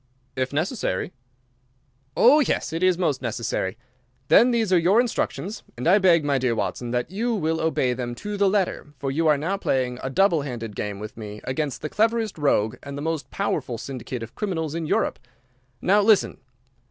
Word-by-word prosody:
"If 130 Hz, 0 st, -1 dB
necessary." 155 Hz, -, -2 dB, 1.0 s
"Oh 275 Hz, +6 st, +7 dB
yes, 260 Hz, -, 0 dB
it 165 Hz, -, -2 dB
is 185 Hz, -2 st, +3 dB
most 155 Hz, -7 st, 0 dB
necessary. 110 Hz, -4 st, -2 dB, 0.5 s
Then 245 Hz, -, +7 dB
these 225 Hz, -5 st, +1 dB
are 180 Hz, -, +6 dB
your 185 Hz, +7 st, +4 dB
instructions, 225 Hz, -3 st, -2 dB, 0.2 s
and 125 Hz, -, -2 dB
I 195 Hz, +4 st, +6 dB
beg, 170 Hz, -5 st, +4 dB
my 140 Hz, -2 st, +2 dB
dear 125 Hz, -2 st, +1 dB
Watson, 120 Hz, +2 st, -3 dB
that 125 Hz, +5 st, -2 dB
you 230 Hz, +4 st, -1 dB
will 160 Hz, -4 st, -1 dB
obey 135 Hz, -6 st, +1 dB
them 120 Hz, -1 st, -4 dB
to 205 Hz, +11 st, -5 dB
the 200 Hz, -1 st, +3 dB
letter, 190 Hz, -7 st, -1 dB
for 135 Hz, 0 st, -3 dB
you 160 Hz, +4 st, +1 dB
are 150 Hz, -2 st, +5 dB
now 175 Hz, +7 st, -1 dB
playing 130 Hz, -8 st, -1 dB
a 130 Hz, -, -3 dB
double 170 Hz, +1 st, +3 dB
handed 115 Hz, -6 st, -6 dB
game 105 Hz, -1 st, -4 dB
with 105 Hz, +2 st, -8 dB
me 105 Hz, -1 st, -7 dB
against 140 Hz, 0 st, -3 dB
the -, -, -1 dB
cleverest 220 Hz, -2 st, 0 dB
rogue 120 Hz, -5 st, +1 dB
and 140 Hz, 0 st, -7 dB
the 145 Hz, -, -5 dB
most 160 Hz, -1 st, -3 dB
powerful 140 Hz, -11 st, -2 dB
syndicate 125 Hz, -1 st, -6 dB
of 115 Hz, -, -9 dB
criminals 160 Hz, -7 st, -3 dB
in 165 Hz, -1 st, -3 dB
Europe. -, -, 0 dB, 0.6 s
Now 205 Hz, +3 st, +4 dB
listen! 210 Hz, 0 st, +3 dB
155 Hz, 190 wpm, -24 LUFS, 125-195 Hz, 1.0 s, Oh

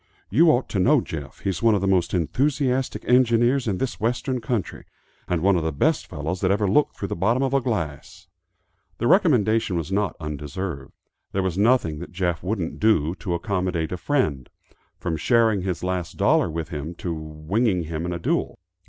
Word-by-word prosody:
You 165 Hz, +1 st, +5 dB
ought 130 Hz, -3 st, +2 dB
to 100 Hz, -, -1 dB
know 90 Hz, -, +5 dB
Jeff; 70 Hz, -3 st, -7 dB
he's 95 Hz, -3 st, -2 dB
one 115 Hz, -2 st, +4 dB
of 100 Hz, -, 0 dB
the 95 Hz, -, 0 dB
most 90 Hz, -3 st, +2 dB
enthusiastic 130 Hz, -, 0 dB
engineers 125 Hz, +1 st, +3 dB
in 100 Hz, -4 st, 0 dB
this 130 Hz, +2 st, -3 dB
western 125 Hz, +3 st, -1 dB
country, 115 Hz, -8 st, -3 dB, 0.4 s
and 90 Hz, -2 st, -1 dB
one 100 Hz, 0 st, +4 dB
of 85 Hz, -, +1 dB
the 80 Hz, 0 st, -1 dB
best 145 Hz, -, +1 dB
fellows 80 Hz, +2 st, -4 dB
that 95 Hz, -, +2 dB
ever 100 Hz, +1 st, +2 dB
looked 145 Hz, +10 st, +2 dB
through 100 Hz, -, -4 dB
the -, -, -2 dB
bottom 115 Hz, +9 st, +1 dB
of 135 Hz, 0 st, 0 dB
a 135 Hz, -, +3 dB
glass." 90 Hz, -, -4 dB, 0.7 s
The 120 Hz, -, -2 dB
recommendation 115 Hz, -, +3 dB
was 80 Hz, +1 st, -4 dB
not 100 Hz, -2 st, 0 dB
undeserved. 75 Hz, 0 st, -5 dB, 0.4 s
There 95 Hz, -, 0 dB
was 95 Hz, -3 st, -1 dB
nothing 100 Hz, -7 st, +2 dB
that 90 Hz, -, -8 dB
Jeff 90 Hz, -2 st, -1 dB
wouldn't 95 Hz, -3 st, -3 dB
do, 85 Hz, -8 st, +3 dB
to 90 Hz, -3 st, -2 dB
accommodate 90 Hz, -2 st, -2 dB
a -, -, -1 dB
friend, 85 Hz, -, -1 dB, 0.5 s
from 80 Hz, -2 st, -3 dB
sharing 110 Hz, +2 st, +3 dB
his 90 Hz, -2 st, -3 dB
last 90 Hz, 0 st, -3 dB
dollar 140 Hz, -, +3 dB
with 80 Hz, 0 st, -4 dB
him, 75 Hz, +2 st, -5 dB
to 85 Hz, 0 st, -4 dB
winging 80 Hz, +6 st, -1 dB
him 80 Hz, 0 st, -4 dB
in -, -, -3 dB
a 85 Hz, -, -2 dB
duel. 85 Hz, -, -1 dB
95 Hz, 190 wpm, -24 LUFS, 85-115 Hz, 0.7 s, You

